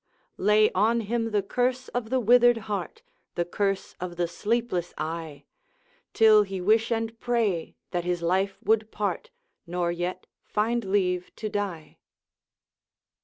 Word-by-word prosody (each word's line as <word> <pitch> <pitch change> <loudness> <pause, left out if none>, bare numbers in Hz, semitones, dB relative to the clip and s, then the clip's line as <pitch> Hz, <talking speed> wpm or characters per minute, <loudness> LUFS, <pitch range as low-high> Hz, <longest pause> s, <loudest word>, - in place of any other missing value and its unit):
'Lay 210 +2 +4
on 225 +5 +2
him 225 +1 -1
the 210 -2 0
curse 250 +4 -1
of 240 -2 -3
the 260 +1 +2
withered 240 +1 +5
heart, 205 - -4 0.3
The 175 - 0
curse 195 +2 -1
of 180 -1 -5
the 175 0 0
sleepless 210 -2 -2
eye; 155 -2 -5 0.7
Till 220 -2 +6
he 195 -2 -3
wish 220 +5 +2
and 225 0 -2
pray 220 -9 0 0.2
that 175 -1 -1
his 175 -1 -2
life 190 +3 +1
would 220 +1 +2
part, 205 -5 -3 0.4
Nor 175 0 -1
yet 175 +2 -4 0.2
find 230 +3 0
leave 185 -2 0
to 215 - -4
die.' 200 -6 -4
205 Hz, 140 wpm, -26 LUFS, 180-225 Hz, 0.7 s, Till